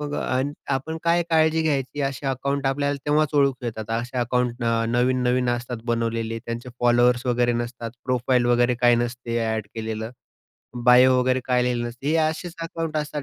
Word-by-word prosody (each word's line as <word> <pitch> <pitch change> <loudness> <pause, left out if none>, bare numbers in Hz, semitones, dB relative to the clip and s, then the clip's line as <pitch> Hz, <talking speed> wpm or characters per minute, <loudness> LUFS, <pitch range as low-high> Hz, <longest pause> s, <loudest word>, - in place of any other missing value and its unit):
मग 145 0 -4
आ 130 -2 -1 0.3
आपण 160 +5 -3
काय 170 +1 +3
काळजी 160 0 +3
घ्यायची? 145 -2 -1
असे 135 0 -3
अकाउंट 135 +1 -1
आपल्याला 140 +1 0
तेव्हाच 150 0 +3
ओळखू 135 -3 +2
येतात. 110 -2 -5
असे 120 +3 -2
अकाउंट 125 0 0
न - - -2 0.3
नवीन-नवीन 125 0 +1
असतात 120 0 -3
बनवलेले, 115 -1 -1
त्यांचे 115 +2 -6
फॉलोअर्स 120 0 +3
वगैरे 120 0 +2
नसतात, 120 0 -4
प्रोफाईल 125 0 +1
वगैरे 120 0 +3
काही 120 -1 +5
नसते 120 0 -2 0.2
ऍड 105 -2 -4
केलेलं, 110 0 -4 0.7
बायो 125 +1 +6
वगैरे 130 0 +1
काही 125 -1 +2
लिहिलेलं 120 -1 -1
नसतं. 125 +4 -10
हे 155 - +2
असेच 160 +2 -1
अकाउंट्स 165 -2 -3
असतात 150 -1 -5
125 Hz, 170 wpm, -23 LUFS, 120-140 Hz, 0.7 s, बायो